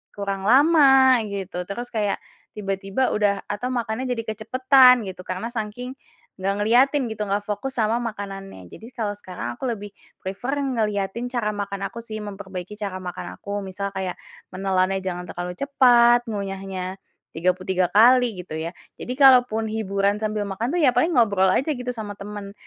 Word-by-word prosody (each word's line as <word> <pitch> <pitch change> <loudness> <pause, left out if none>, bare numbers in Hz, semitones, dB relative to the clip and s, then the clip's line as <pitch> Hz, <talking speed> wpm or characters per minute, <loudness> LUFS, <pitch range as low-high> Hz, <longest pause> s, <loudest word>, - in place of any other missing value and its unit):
kurang 200 -1 -3
lama 270 -2 +6
gitu 195 -2 -5
terus 240 +5 -4
kayak 205 -2 0 0.4
tiba-tiba 195 +2 -3
udah 205 -1 +3 0.2
atau 205 +5 -3
makannya 235 +1 -2
jadi 230 -2 -4
kecepatan 255 +4 +5
gitu, 185 - -10
karena 185 +5 -3
sangking 230 +2 -5 0.5
gak 195 +1 +1
ngeliatin 255 +6 +3
gitu 215 -1 -6
gak 205 +1 -1
fokus 210 +6 -3
sama 225 0 +2
makanannya. 195 - -6
Jadi 225 - -11
kalau 210 -3 -1
sekarang 175 -12 -6
aku - - -12
lebih 205 -1 -8 0.3
prefer 200 +8 -4
ngeliatin 220 -4 -1
cara 235 -4 0
makan 200 -1 -4
aku 235 - -9
sih, 220 -1 -7
memperbaiki 195 -2 -7
cara 200 -3 -4
makan 180 -1 -7
aku - - -12 0.2
misal 200 +1 -4
kayak 190 -2 -3 0.4
menelannya 190 0 +1
jangan 180 -1 -4
terlalu 180 0 -5
cepat, 240 -3 +5
ngunyahnya 195 -2 -4 0.4
33 185 +2 0
kali 245 +4 +7 0.2
gitu - - -9
ya. 160 +1 -3 0.3
Jadi 250 - -5
kalaupun 250 -5 +5
hiburan 200 -2 0
sambil 215 -1 -1
makan 200 +5 -3
tuh 355 - +1
ya 280 - +6
paling 335 +2 +2
ngobrol 200 -5 +4
aja 270 +9 0
gitu 250 -1 -5
sama 215 -3 -6
teman. 200 0 -8
210 Hz, 160 wpm, -23 LUFS, 195-240 Hz, 0.5 s, kali